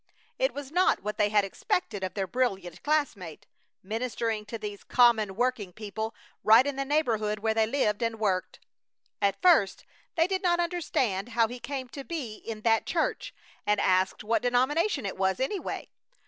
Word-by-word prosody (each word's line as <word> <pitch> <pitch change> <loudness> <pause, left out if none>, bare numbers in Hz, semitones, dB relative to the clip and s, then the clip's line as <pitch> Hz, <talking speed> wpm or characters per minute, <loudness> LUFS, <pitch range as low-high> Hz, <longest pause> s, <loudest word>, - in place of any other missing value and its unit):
It - - +2
was 285 -1 -7
not 360 - +2
what 210 +1 -4
they 210 -1 +4
had 205 -1 +3
expected 205 - -2
of 185 - -3
their 195 -2 -1
brilliant 195 -6 -2
classmate, 255 - -1 0.4
ministering 220 0 -2
to 230 - -5
these 210 -2 -7
common 225 -5 +4
working 240 -4 -1
people 220 +3 -5 0.3
right 225 +4 +7
in 285 -1 -2
the 275 0 -2
neighborhood 230 -8 +1
where 220 +1 0
they 220 0 +2
lived 220 -4 0
and 230 -1 -1
worked. 190 -4 -1 0.6
At 200 -1 +1
first 315 - +4 0.3
they 330 - +4
did 380 +1 -1
not 345 -2 +2
understand 265 - -1
how 230 -1 +5
he 245 +2 -8
came 265 0 -5
to 275 +2 -7
be 265 -10 -5
in 220 -2 -7
that 225 0 +2
church, - - -1 0.4
and 210 0 +3
asked 185 +2 +2
what 225 +2 +1
denomination 270 - +1
it 195 - -4
was, 190 -1 +1
anyway. 340 +9 -3
225 Hz, 175 wpm, -28 LUFS, 205-275 Hz, 0.6 s, right